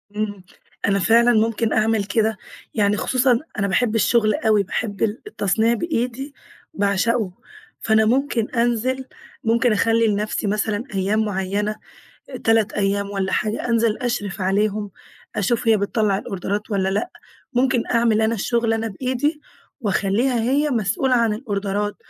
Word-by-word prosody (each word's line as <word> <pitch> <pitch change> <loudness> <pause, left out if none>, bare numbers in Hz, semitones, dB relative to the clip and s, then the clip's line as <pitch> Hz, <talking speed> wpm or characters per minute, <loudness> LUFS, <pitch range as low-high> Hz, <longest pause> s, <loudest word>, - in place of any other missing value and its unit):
إمم، 205 -3 -3 0.4
أنا 195 0 +2
فعلًا 235 +6 +4
ممكن 225 0 +1
أعمل 220 -1 +2
كده، 220 +1 0 0.4
يعني 210 -1 +2
خصوصًا 255 0 +2 0.2
أنا 200 - +1
باحب 225 +3 +1
الشغل 220 0 +3
أوي، 215 -2 +2
باحب 200 +1 -4
ال 220 +1 -1
التصنيع 225 - +1
بإيدي 265 0 -2 0.4
باعشقه، 200 - +1 0.5
فأنا 220 0 +3
ممكن 245 -2 +1
أنزل، 240 +2 0 0.4
ممكن 235 +2 +2
أخلّي 225 +1 +2
لنفسي 210 0 -1
مثلًا 210 +1 -1
أيام 200 +3 +1
معيّنة 205 +1 -2 0.7
3 225 -2 +3
أيام 200 0 0
والّا 195 -1 -2
حاجة 215 +3 -1
أنزل 230 -2 +2
أشرف 235 -7 -3
عليهم 205 +2 0 0.5
أشوف 230 +3 0
هي 220 - +6
بتطّلع 200 -1 0
الأوردرات 200 +3 -4
والّا 195 -2 +1
لأ، 200 +3 -1 0.4
ممكن 255 -1 +2
أعمل 230 -2 +3
أنا 220 +1 +2
الشغل 230 +1 0
أنا 225 0 -1
بإيدي 260 - -2 0.4
وأخلّيها 220 +4 +1
هي 285 +5 +1
مسؤولة 235 +2 +1
عن 230 -3 +2
الأوردرات 205 -2 -2
220 Hz, 135 wpm, -21 LUFS, 205-235 Hz, 0.7 s, هي